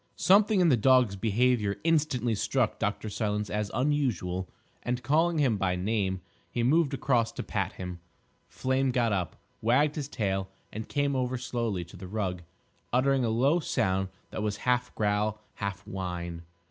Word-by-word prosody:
Something 200 Hz, +1 st, +4 dB
in 175 Hz, -, +5 dB
the 130 Hz, -, +5 dB
dog's 125 Hz, -2 st, +4 dB
behaviour 110 Hz, 0 st, +1 dB
instantly 145 Hz, -8 st, +2 dB
struck 115 Hz, +2 st, 0 dB
Dr. 105 Hz, 0 st, -1 dB
Silence 105 Hz, 0 st, -2 dB
as 105 Hz, -1 st, -1 dB
unusual, 120 Hz, -, 0 dB, 0.3 s
and, 125 Hz, 0 st, -2 dB
calling 160 Hz, +6 st, +2 dB
him 130 Hz, -8 st, +2 dB
by 95 Hz, -2 st, 0 dB
name, 95 Hz, -1 st, -1 dB, 0.3 s
he 120 Hz, -, -1 dB
moved 145 Hz, +2 st, +3 dB
across 125 Hz, -4 st, +1 dB
to -, -, -4 dB
pat -, -, -2 dB
him. 90 Hz, -1 st, -6 dB, 0.5 s
Flame 130 Hz, +1 st, 0 dB
got 120 Hz, -4 st, +1 dB
up, 90 Hz, -4 st, -2 dB, 0.3 s
wagged 135 Hz, +7 st, +3 dB
his 150 Hz, -4 st, -4 dB
tail, 95 Hz, -7 st, -2 dB, 0.2 s
and 110 Hz, +1 st, -6 dB
came 145 Hz, -1 st, 0 dB
over 130 Hz, 0 st, 0 dB
slowly 115 Hz, -7 st, -2 dB
to 85 Hz, -, -13 dB
the 95 Hz, 0 st, -8 dB
rug, 95 Hz, -3 st, -2 dB, 0.5 s
uttering 130 Hz, +1 st, +3 dB
a 115 Hz, -, +1 dB
low 135 Hz, +9 st, +3 dB
sound 95 Hz, -, 0 dB, 0.2 s
that -, -, -4 dB
was 105 Hz, -1 st, -1 dB
half 125 Hz, 0 st, +2 dB
growl, 105 Hz, 0 st, 0 dB, 0.2 s
half 100 Hz, -1 st, -4 dB
whine. 90 Hz, -4 st, -4 dB
115 Hz, 160 wpm, -29 LUFS, 100-130 Hz, 0.5 s, in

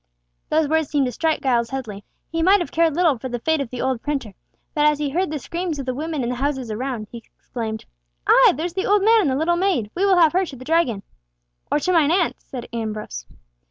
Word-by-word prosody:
Those 310 Hz, -1 st, +2 dB
words 315 Hz, -1 st, +1 dB
seemed 285 Hz, -3 st, +1 dB
to 250 Hz, -, -2 dB
strike 320 Hz, +6 st, -1 dB
Giles 240 Hz, -3 st, +1 dB
Headley. 225 Hz, -7 st, -6 dB, 0.3 s
He 330 Hz, 0 st, -1 dB
might 385 Hz, +4 st, +5 dB
have 345 Hz, -, -4 dB
cared 325 Hz, -2 st, +2 dB
little 325 Hz, -8 st, +2 dB
for 260 Hz, -, -5 dB
the 245 Hz, -, -3 dB
fate 315 Hz, +5 st, 0 dB
of 270 Hz, -, -4 dB
the 250 Hz, -, -5 dB
old 260 Hz, -3 st, -1 dB
printer, 275 Hz, -8 st, -3 dB, 0.4 s
but 300 Hz, -1 st, +3 dB
as 300 Hz, -1 st, +3 dB
he 290 Hz, -1 st, -2 dB
heard 360 Hz, +5 st, 0 dB
the 305 Hz, -, -3 dB
screams 335 Hz, +3 st, -4 dB
of 275 Hz, -, -5 dB
the 255 Hz, -, -2 dB
women 305 Hz, 0 st, -3 dB
in 235 Hz, -, -2 dB
the 250 Hz, -, -2 dB
houses 265 Hz, -3 st, -2 dB
around, 235 Hz, 0 st, -3 dB
he 235 Hz, -, -7 dB, 0.2 s
exclaimed, 220 Hz, -2 st, -5 dB, 0.4 s
"Ay! -, -, +6 dB
there's 330 Hz, +4 st, -3 dB
the 380 Hz, +1 st, -2 dB
old 410 Hz, -1 st, +3 dB
man 450 Hz, +1 st, +5 dB
and 325 Hz, -, +1 dB
the 260 Hz, -, 0 dB
little 330 Hz, +4 st, +1 dB
maid! 345 Hz, -, 0 dB
We 375 Hz, -, -1 dB
will 380 Hz, -2 st, +4 dB
have 325 Hz, -3 st, +5 dB
her 370 Hz, +2 st, +3 dB
to 310 Hz, -7 st, -7 dB
the 255 Hz, 0 st, -11 dB
Dragon!" 310 Hz, -11 st, +1 dB, 0.7 s
"Or -, -, +3 dB
to 365 Hz, +5 st, 0 dB
mine 315 Hz, -4 st, +4 dB
aunt's," 345 Hz, 0 st, 0 dB
said 250 Hz, -3 st, -7 dB
Ambrose. 215 Hz, -, -5 dB
290 Hz, 245 wpm, -22 LUFS, 245-335 Hz, 0.7 s, Ay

